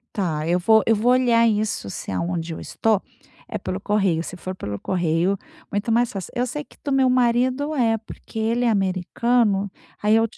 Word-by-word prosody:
Tá. 160 -6 -1
Eu 175 +2 +2
vou 220 +4 +5
eu 225 - +5
vou 230 +4 +3
olhar 240 -2 +4
isso 210 - -1
se 95 - -6
é - - -2
aonde 170 - -2
eu - - -6
estou 220 -3 0 0.5
é - - -4
pelo 185 +1 -4
correio. 195 -6 +1
Se 180 - -7
for 185 +1 -6
pelo 100 - -5
correio, 175 - 0 0.3
muito 205 +3 -2
mais 240 +1 +3
fácil. 195 -3 -6
Eu 245 +1 0
sei 295 +4 -5
que - - -21
do 280 - -1
meu 265 -1 +4
marido 255 +4 +2
é, 225 -4 +2
porque 220 0 -10
ele 230 +2 +1
é 240 - +3
americano. 200 +2 +1 0.3
Aí 210 +1 +4
eu 225 - +4
210 Hz, 205 wpm, -23 LUFS, 185-240 Hz, 0.5 s, vou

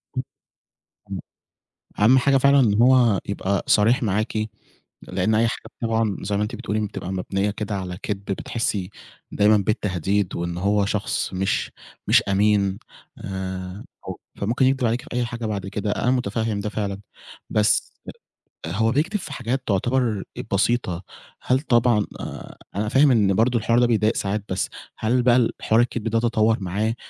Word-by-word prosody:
امم، - - 0 0.9
إمم، - - -4 0.8
أهم 120 +6 +6
حاجة 135 +1 +4
فعلًا 140 +1 +5
إن 110 -3 +3
هو 120 -5 +5
يبقى 100 -1 -1
صريح 120 +6 +4
معاكِ، 110 +1 -1 0.7
لإن 110 0 0
أي 115 +2 +3
حاجة 115 - -4 0.2
طبعًا، 115 -3 0
زي 100 +1 -1
ما 105 - +1
أنتِ 110 +3 -4
بتقولي، 110 -2 -2
بتبقى 95 - -6
مبنية 95 +2 -1
كده 105 0 -4
على 90 -2 -4
كدب، 100 -2 -4
بتحسي 100 -1 -2 0.4
دايمًا 105 +1 +4
بالتهديد، 100 -2 -1
وإن 85 0 -3
هو 100 +2 +2
شخص 105 -1 -2
مش، 95 +1 -1 0.4
مش - - +6
أمين، 100 0 +2 0.4
آآ، 95 0 -5 0.5
فممكن 115 +6 +1
يكدب 130 -1 +2
عليكِ 120 +2 0
في - - -16
أي 120 0 0
حاجة 120 -1 -5
بعد 100 -3 -3
كده، 105 +1 -2
أنا 125 +4 +1
متفهم 110 -3 -1
ده 105 - -3
فعلًا، 100 -2 -3 0.5
بس 105 -1 +2 0.7
هو 110 +7 +1
بيكدب 160 - 0
في 155 -6 -7
حاجات 125 +1 -2
تعتبر 115 +1 +1 0.3
بسيطة، 100 -4 +1 0.4
هل 130 +1 +2
طبعًا، 120 -6 +3
آآ، - - -8 0.2
أنا 105 +1 -1
فاهم 135 +4 +5
إن 105 -5 +3
برضه 120 +3 +2
الحوار 115 +2 +2
ده 120 - +4
بيضايق 110 -2 +2
ساعات، 100 +1 -1
بس 95 0 -1 0.3
هل 120 +3 +1
بقى 120 -1 +5
ال 120 -2 +3
حوار 110 +2 +3
الكدب 120 -2 -2
ده 115 +1 +1
تطور 115 -1 +2
معاه، 100 +4 -1
110 Hz, 160 wpm, -23 LUFS, 100-120 Hz, 0.9 s, أهم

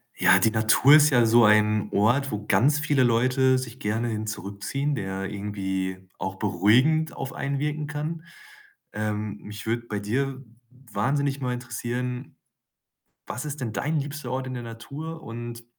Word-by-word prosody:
Ja, - - +5
die 110 - +3
Natur 110 +6 +6
ist 150 -1 +6
ja 120 -3 +5
so 115 0 +6
ein 105 0 +3
Ort, 125 +7 +2
wo 105 0 -4
ganz 135 +11 +3
viele 145 -3 +2
Leute 130 +2 +3
sich 130 -1 -6
gerne 110 +3 -1
hin 110 -1 -3
zurückziehen, 110 +8 -3
der 95 -3 -4
irgendwie 95 -2 -3 0.2
auch 95 0 -4
beruhigend 115 - +2
auf 135 - -5
einen 140 0 -2
wirken 150 0 -2
kann. 155 +3 -4 0.7
Ähm, 105 -1 -3
mich 105 0 -8
würde 115 +1 -1
bei 105 -2 -3
dir, 130 +6 -2
w 120 +1 -23
wahnsinnig 140 +6 0
mal 125 -1 -1
interessieren, 125 +1 -4 0.9
was 125 - -5
ist 150 0 -5
denn 115 -4 -3
dein 155 +7 -1
liebster 140 -2 -6
Ort 130 0 -2
in 130 - -5
der 120 - -5
Natur 145 +8 -8
und 120 -1 -7
120 Hz, 165 wpm, -25 LUFS, 105-140 Hz, 0.9 s, Natur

